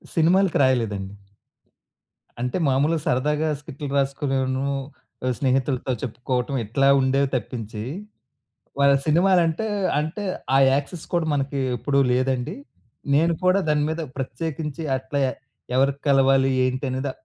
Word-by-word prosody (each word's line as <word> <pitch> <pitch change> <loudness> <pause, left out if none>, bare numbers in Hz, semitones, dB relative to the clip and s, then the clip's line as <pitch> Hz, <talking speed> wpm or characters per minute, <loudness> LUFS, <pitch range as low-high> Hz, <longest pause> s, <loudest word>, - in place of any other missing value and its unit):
సినిమాలకు 180 +3 +3
రాయలేదండి. 105 -7 0 1.3
అంటే 125 +5 -1
మామూలుగా 145 +4 +2
సరదాగా 150 +5 +1
స్క్రిప్ట్లు 145 0 -7
రాసుకునేను 135 -1 0 0.6
ఆహ్, 130 - +1
స్నేహితులతో 130 -1 0
చెప్పుకోవడం 125 +2 -2
ఇట్లా 135 +6 +1
ఉండేవి 135 +1 +2
తప్పించి, 115 -3 -4 1.0
వాళ్ళ 140 0 +5
సినిమాలంటే 175 +3 +3 0.3
అంటే 160 +7 -4 0.3
ఆ - - +6
యాక్సెస్ 145 +4 -2
కూడా 170 -2 +1
మనకి 140 0 -1 0.2
ఎప్పుడు 140 +4 0
లేదండి. 130 +4 0 0.6
నేను 165 +4 +3
కూడా 185 +2 +4
దాని 150 -1 +2
మీద 160 +1 -3 0.2
ప్రత్యేకించి 150 +3 -4
అట్లా 130 +2 -4
ఎ - - -2 0.4
ఎవరికి 140 +1 +2
కలవాలి? 135 -1 +4
ఏంటి? 130 +2 -1
అనేది 130 +2 -2
135 Hz, 115 wpm, -23 LUFS, 130-150 Hz, 1.3 s, ఆ